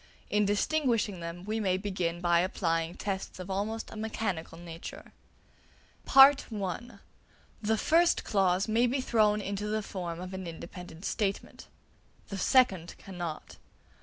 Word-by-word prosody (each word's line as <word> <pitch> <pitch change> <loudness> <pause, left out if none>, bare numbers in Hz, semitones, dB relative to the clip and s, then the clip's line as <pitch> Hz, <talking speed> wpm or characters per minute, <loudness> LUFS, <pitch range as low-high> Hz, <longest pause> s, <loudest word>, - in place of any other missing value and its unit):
In 210 0 +3
distinguishing 220 - +1
them 170 +2 -7
we 215 +2 -1
may 185 -3 +1
begin 185 -4 -2
by 175 -1 +4
applying 170 -2 0
tests 195 -2 -4
of 185 +1 -6
almost 210 +4 -3
a - - -9
mechanical 215 -7 -3
nature. 170 -1 -9 1.0
(a) 270 +1 +10 1.3
The 220 +1 +1
first 335 +8 +3
clause 195 -1 +2
may 230 +3 +3
be 260 +3 0
thrown 215 -4 +2
into 200 +1 -3
the 215 0 -1
form 175 -4 -5
of 185 +1 -7
an 190 -1 -5
independent 170 +1 -9
statement; 200 -2 -2 0.6
the 200 - -4
second 190 -9 +3
cannot. 175 -5 -7
195 Hz, 135 wpm, -30 LUFS, 175-215 Hz, 1.3 s, a